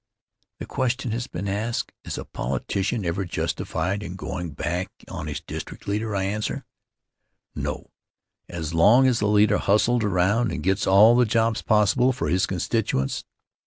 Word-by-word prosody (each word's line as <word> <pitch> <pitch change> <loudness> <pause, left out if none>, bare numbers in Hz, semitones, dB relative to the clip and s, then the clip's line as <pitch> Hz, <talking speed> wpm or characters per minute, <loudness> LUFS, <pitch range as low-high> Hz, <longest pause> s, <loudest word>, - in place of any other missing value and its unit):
The - - -6
question 130 -2 -1
has 120 +3 -3
been 100 -3 -5
asked: 110 +4 -2
Is - - -4
a - - -6
politician 95 - -2
ever 85 +3 -1
justified 95 +2 -2
in 95 -3 -6
going' 90 -2 -5
back 90 +5 -2 0.2
on - - -6
his - - -4
district - - -8
leader? 105 +1 -1
I 95 - 0
answer: 105 +2 -3 0.9
"No; - - -5 0.6
as 85 -1 -5
long 105 +11 +6
as 125 -3 +3
the 105 - +1
leader 105 0 +4
hustles 115 +4 +2
around 100 +3 +2
and 80 -3 -4
gets 95 +3 +1
all 105 +5 +7
the 125 0 +5
jobs 115 0 +1
possible 110 +5 +3
for 130 - -2
his 90 +1 +2
constituents." 90 - -1
105 Hz, 160 wpm, -24 LUFS, 95-115 Hz, 0.9 s, all